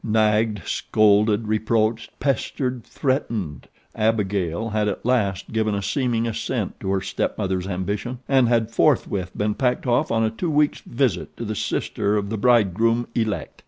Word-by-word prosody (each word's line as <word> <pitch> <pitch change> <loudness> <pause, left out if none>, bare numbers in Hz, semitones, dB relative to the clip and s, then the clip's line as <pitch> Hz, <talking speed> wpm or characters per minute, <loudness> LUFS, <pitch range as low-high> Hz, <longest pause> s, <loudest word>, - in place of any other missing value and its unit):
Nagged, 110 -3 +1
scolded, 105 +1 +2
reproached, 110 +1 0
pestered, 130 -2 -1
threatened, 115 - -2 0.3
Abigail 105 -3 0
had 105 -1 0
at 100 - -3
last 105 -7 0
given 110 -2 0
a 100 - -3
seeming 120 -4 0
assent 115 -2 -3
to 95 - -4
her 95 -1 +1
stepmother's 95 -1 -2
ambition; 100 +6 -3
and 135 -3 +4
had 115 -2 +1
forthwith 105 - +1
been 105 +1 0
packed 125 +2 0
off 130 +5 +2
on 115 0 +2
a 110 - +1
two 170 +10 -3
weeks 150 -1 +2
visit 120 -7 -1
to 115 - -5
the 110 - -2
sister 105 0 -1
of 100 0 -2
the 110 - -1
bride 115 -6 +4
groom 115 +3 +1
elect. 110 -3 -2
110 Hz, 160 wpm, -23 LUFS, 100-120 Hz, 0.3 s, and